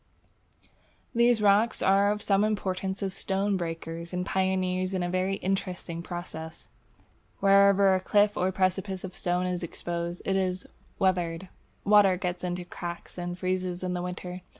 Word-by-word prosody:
These 235 -2 +3
rock 210 +3 +4
plants - - -4
are 195 +1 +4
of 210 0 -3
some 200 0 +3
importance 195 -2 -1
as 190 -1 -2
stonebreakers 170 -4 -2
and 180 0 -1
pioneers 185 0 0
in 185 - 0
a 175 - -2
very 185 +1 0
interesting 185 -3 -3
process. 170 -2 -7 0.7
Wherever 200 0 +5
a 185 - +2
cliff 205 +2 +3
or 185 +1 +1
precipice 190 0 -1
of 190 -1 -6
stone 180 +1 -1
is 180 -1 -2
exposed, 170 0 -4
it 195 - +1
is 185 -1 -1 0.3
"weathered." 180 -1 0 0.3
Water 200 -2 +5
gets 180 0 -3
into 180 0 -2
the 175 - -21
cracks 175 +1 -7
and 175 0 -4
freezes 185 -1 -2
in 180 0 -1
winter. 180 0 -6
185 Hz, 150 wpm, -28 LUFS, 180-195 Hz, 0.7 s, Wherever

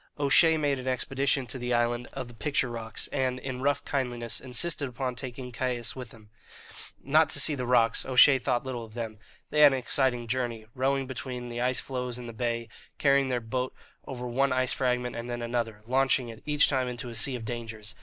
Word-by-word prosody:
O'Shea 160 +3 +5
made 145 -3 +1
an 130 - -7
expedition 135 +1 0
to 125 +3 -4
the 125 0 0
island 120 +1 0
of 130 -2 -5
the 120 - -11
picture 125 +2 0
rocks, 115 -2 -4
and, 130 -2 0
in 130 -1 -5
rough 145 +1 +1
kindliness, 120 -4 -2
insisted 140 +2 0
upon 125 +1 -3
taking 125 0 -7
Caius 120 -1 -3
with 125 -3 -7
him, 110 -2 -17 0.7
not 155 +4 +4
to - - -1
see 155 - +5
the 125 -3 -3
rocks 120 -2 +3
O'Shea 130 +1 +6
thought 125 -1 0
little 125 -3 -4
of 110 0 -12
them. 110 -3 -5 0.3
They 150 - +1
had 145 -2 +8
an - - +1
exciting 125 -1 0
journey, 120 -2 -2
rowing 135 +1 0
between 125 -1 -6
the 120 0 -4
ice 125 +1 +1
floes 125 -2 -3
in 125 - -7
the 115 - -7
bay, 115 0 -2 0.3
carrying 140 -1 +3
their 125 -1 0
boat 125 +3 -3 0.3
over 125 -2 -5
one 135 +3 +1
ice 130 0 +2
fragment 125 -2 0
and 115 +1 -5
then 120 0 -3
another, 115 -3 -2
launching 130 0 +2
it 115 0 -10
each 150 -1 +5
time 130 -3 0
into 125 0 -5
a - - -7
sea 125 +3 +2
of 115 -2 -6
dangers. 115 -2 -6
125 Hz, 210 wpm, -28 LUFS, 120-135 Hz, 0.7 s, had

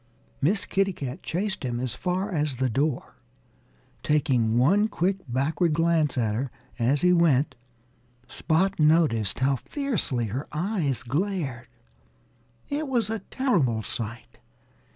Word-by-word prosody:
Miss 195 +9 +1
Kitty 195 0 +1
Cat 135 +1 -6
chased 190 +1 -2
him 120 -2 -2
as 125 -2 -2
far 185 +3 -2
as 150 -5 0
the 130 0 0
door. 140 +3 -1 0.8
Taking 130 -7 +2
one 195 - +4
quick 190 -1 0
backward 150 +7 +1
glance 165 -4 +2
at 110 -4 +1
her 125 +5 -2 0.3
as 130 +5 +2
he 180 0 +5
went, 155 -5 +3 0.7
Spot 185 +4 0
noticed 150 - +3
how 135 +1 +3
fiercely 205 - -2
her 135 +4 -3
eyes 160 - -1
glared. 140 - -2 1.0
It 295 +1 -2
was 235 -5 0
a 225 - -2
terrible 175 - 0
sight. 115 +1 -5
150 Hz, 130 wpm, -26 LUFS, 125-190 Hz, 1.0 s, he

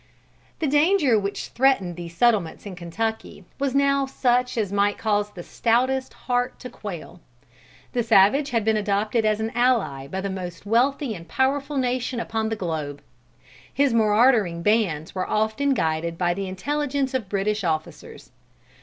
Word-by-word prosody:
The 320 - -2
danger 295 - +3
which 200 0 -4
threatened 235 -9 +2
these 170 -1 -9
settlements 215 -9 +2
in 195 -3 -7
Kentucky 200 +3 -4
was 275 -1 -1
now 275 0 +2
such 250 -2 +1
as 210 -4 -1
might 205 0 +2
cause 210 -2 0
the 190 -4 -10
stoutest 255 +6 0
heart 245 0 0
to 250 - -8
quail. 180 -5 -8 0.7
The 245 - +1
savage 225 +6 +4
had 230 -3 0
been 220 -1 +3
adopted 210 +2 0
as 215 0 +2
an 220 +1 -2
ally 230 - +1
by 190 +6 -4
the 200 - -3
most 180 -1 -6
wealthy 250 +4 +1
and 170 -4 -10
powerful 275 - 0
nation 250 -1 -1
upon 220 -1 -2
the 225 - -1
globe. 155 -7 -4 0.7
His 280 -3 +2
marauding 215 -5 +3
bands 190 -8 +1
were 185 -1 -3
often 220 +6 +1
guided 165 -1 -1
by 175 -1 +1
the 195 +1 -4
intelligence 280 +7 -2
of 240 -8 -2
British 210 +1 -1
officers. 160 -2 -4
220 Hz, 155 wpm, -24 LUFS, 190-255 Hz, 0.7 s, savage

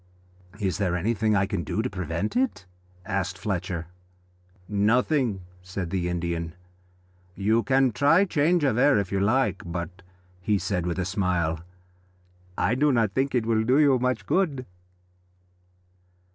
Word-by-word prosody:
"Is 95 -3 -1
there 90 -3 0
anything 110 +3 +1
I 95 0 +3
can 95 -4 -3
do 110 +8 -2
to - - 0
prevent 90 -1 -3
it?" 250 - 0 0.4
asked 95 -2 -2
Fletcher. 90 -3 -3 0.8
"Nothing," 110 +1 +1 0.2
said 90 -1 -5
the 90 -2 -1
Indian. 85 -1 -3 0.8
"You 110 +4 +2
can 135 0 +2
try 145 - +4
change 170 0 +2
of 125 -4 +2
air 140 -2 +5
if 100 -3 -1
you 100 - 0
like, 110 +1 +1
but," 90 +2 -6 0.4
he 105 +3 +1
said 90 -3 -2
with 85 - -2
a 95 - -1
smile, 90 -4 0 1.0
"I 100 - +1
do 145 +4 +3
not 115 -5 +2
think 135 +2 0
it 120 -3 +1
will 110 -1 +2
do 125 +4 +3
you 140 -4 +4
much 125 +1 -1
good." 150 -9 0
105 Hz, 145 wpm, -26 LUFS, 90-130 Hz, 1.0 s, air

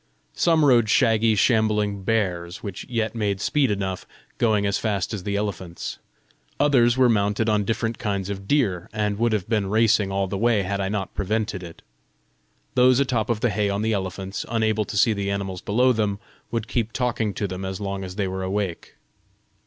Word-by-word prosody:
Some 165 -3 +3
rode 120 -5 +4
shaggy, 115 -2 +3
shambling 105 -2 +2
bears, 95 -4 -1
which 100 -4 -6
yet 115 -3 -1
made 105 -4 -1
speed 140 +4 +1
enough, 95 -2 -3 0.3
going 110 -3 +2
as 100 0 0
fast 100 -2 -1
as 105 - -3
the 100 +2 -3
elephants. 95 -4 -4 0.6
Others 125 -4 +4
were 130 -1 +5
mounted 105 -1 +1
on 105 -2 +2
different 115 +1 -2
kinds 100 -4 -2
of 100 -1 -6
deer, 100 - +1
and 105 -1 -1
would 120 0 +2
have 105 -4 -1
been 105 -3 0
racing 110 -2 +3
all 100 0 0
the 95 +1 -4
way 115 -2 +2
had 100 +1 -2
I 95 -1 -1
not 100 -2 -3
prevented 105 0 -2
it. 85 -2 -11 0.9
Those 125 0 +5
atop 125 -5 0
of 110 -2 0
the 120 - +2
hay 105 +1 0
on 100 +1 -1
the 110 0 +1
elephants, 95 0 -3
unable 110 -2 +1
to 105 - -5
see 110 +3 +4
the 100 -1 -2
animals 95 -2 -3
below 125 +5 +3
them, 105 -3 0 0.3
would 115 -1 -3
keep 115 -2 -2
talking 120 -4 0
to 100 - -1
them 95 0 -6
as 95 +1 -4
long 100 -1 -4
as 90 -1 -7
they 100 -2 -1
were 95 0 -4
awake. 95 -2 -3
105 Hz, 190 wpm, -24 LUFS, 100-115 Hz, 0.9 s, were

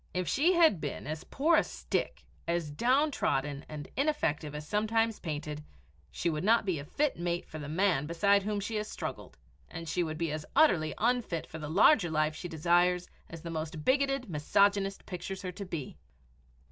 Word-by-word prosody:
If 180 -1 -1
she 315 - +3
had 325 - +4
been 145 - -4
as 155 +4 -5
poor 315 +4 +2
a - - +4
stick, - - -3 0.2
as 170 -3 -1
downtrodden 235 - +1
and 150 -1 -7
ineffective 160 - 0
as 150 0 -6
sometimes 220 +2 +1
painted, 150 -2 -5 0.5
she - - -3
would 155 -1 -1
not 225 +2 +4
be 180 -6 0
a 140 - -7
fit 285 - -1
mate 175 0 -2
for 155 - -8
the 145 -1 -6
man 165 -3 +1
beside 200 +5 +3
whom 205 +1 -2
she 215 +2 -3
has 210 0 -2
struggled, - - -6 0.3
and 165 0 -7
she 175 +3 0
would 160 -2 -2
be 165 -2 -1
as 155 0 -3
utterly 165 - +4
unfit 230 -8 0
for 160 - -9
the 150 -1 -6
larger 195 - +5
life 155 0 +1
she 175 - -6
desires 175 +2 +2 0.2
as 165 -1 -9
the 170 - -5
most 155 -1 -5
bigoted 275 -1 +2
misogynist 195 +5 +1
pictures 190 +2 -6
her 185 - -3
to 195 +3 -7
be. 160 -7 -6
175 Hz, 185 wpm, -30 LUFS, 155-215 Hz, 0.5 s, larger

